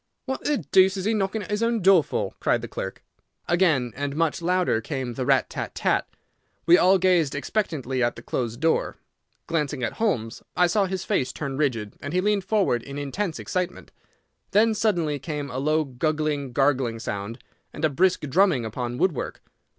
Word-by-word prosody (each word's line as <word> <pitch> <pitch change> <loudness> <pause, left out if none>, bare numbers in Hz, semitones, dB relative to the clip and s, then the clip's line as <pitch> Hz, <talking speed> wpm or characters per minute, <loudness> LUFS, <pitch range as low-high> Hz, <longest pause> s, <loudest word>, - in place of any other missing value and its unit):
"What 265 0 -4
the 295 -1 +2
deuce 190 -3 +3
is 190 - -3
he 220 - +2
knocking 205 0 -1
at 205 - -9
his 210 +1 0
own 230 0 +1
door 190 -4 +6
for?" - - -3
cried - - +1
the - - -4
clerk. - - -6 0.4
Again 160 - +2
and 140 0 -3
much 165 +2 0
louder 180 -9 +1
came 125 +1 -4
the 130 +1 -3
rat 135 -2 +3
tat - - -6
tat. - - +1 0.6
We 170 - +7
all 185 +2 +5
gazed 180 -6 +2
expectantly 145 - -2
at 120 0 +1
the - - -11
closed 120 -2 -3
door. 160 +2 +1 0.5
Glancing 150 -5 -2
at 115 - -1
Holmes, 120 - -1 0.2
I 180 - +5
saw 195 +3 +2
his 190 -1 -4
face 125 -1 0
turn 140 +1 -4
rigid, 120 -8 -1
and 145 +2 -5
he - - +4
leaned 205 -1 +1
forward 190 - +1
in 140 +3 -8
intense 160 +5 -3
excitement. 180 -1 -4 0.6
Then 220 +2 +4
suddenly 175 -9 0
came 145 -1 -5
a 130 - -3
low 155 +3 +2
guggling, 145 0 -1
gargling 130 -3 +1
sound, 105 0 -5 0.3
and 155 - -2
a - - +3
brisk 185 +6 +2
drumming 150 - +2
upon 120 +2 -4
woodwork. 170 -2 -1
155 Hz, 185 wpm, -25 LUFS, 130-190 Hz, 0.6 s, We